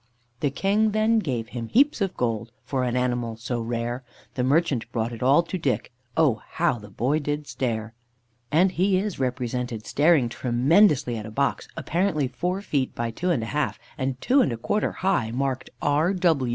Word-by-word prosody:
"The 145 - +1
King 205 +9 +1
then 220 +1 +3
gave 125 - -3
him 120 -2 -5
heaps 275 - +3
of 195 -2 -1
gold 115 -2 -1
For 130 -2 -1
an 125 -1 -1
animal 120 -2 -1
so 120 +1 -3
rare; 120 +2 -3 0.3
The 125 - -1
merchant 130 -5 +1
brought 115 0 -2
it 115 - -8
all 140 +6 +5
to 180 +2 -4
Dick, 135 -5 -1 0.3
Oh, 145 -9 +3
how 160 -7 +1
the 105 0 -12
boy 130 +9 0
did 145 0 -3
stare!" 115 -4 -3 0.6
(And 180 +5 +4
he 185 +2 +2
is 200 -3 -2
represented 125 -3 -2
staring 150 -4 +3
tremendously 130 - +3
at 105 0 -6
a - - -7
box, 140 +6 -1
apparently 165 -5 0
four 180 +10 -3
feet 140 -9 -1
by 115 -1 -2
two 180 +10 -2
and 135 -10 +1
a 115 - -5
half, 150 0 0 0.2
and 130 -3 -2
two 265 - +4
and 235 - +2
a 115 - -3
quarter 205 - 0
high, 185 -12 0
marked 130 +1 -2
"R. 155 +7 +2
130 Hz, 185 wpm, -25 LUFS, 120-170 Hz, 0.6 s, all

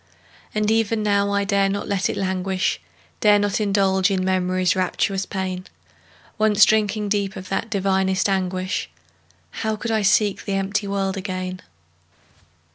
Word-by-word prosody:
And 215 0 +1
even 225 -1 +1
now, 200 -1 +2
I 200 0 +1
dare 200 -1 +2
not 200 +1 -3
let 195 -2 0
it - - -3
languish, 190 0 -1 0.4
Dare 210 -2 +5
not 205 +1 0
indulge 195 -2 +2
in 185 -2 0
Memory's 185 0 +1
rapturous 190 +1 -1
pain; 185 -2 -4 0.7
Once 215 -1 +5
drinking 210 -1 +1
deep 200 -2 -1
of 185 0 -8
that 210 +4 -2
divinest 190 -2 +1
anguish, 185 0 -1 0.7
How 220 0 0
could 225 +2 -4
I 220 -1 +1
seek 205 0 +2
the 200 - -2
empty 200 +1 -1
world 195 -1 -1
again? 185 -1 -4
195 Hz, 145 wpm, -22 LUFS, 190-205 Hz, 0.7 s, Dare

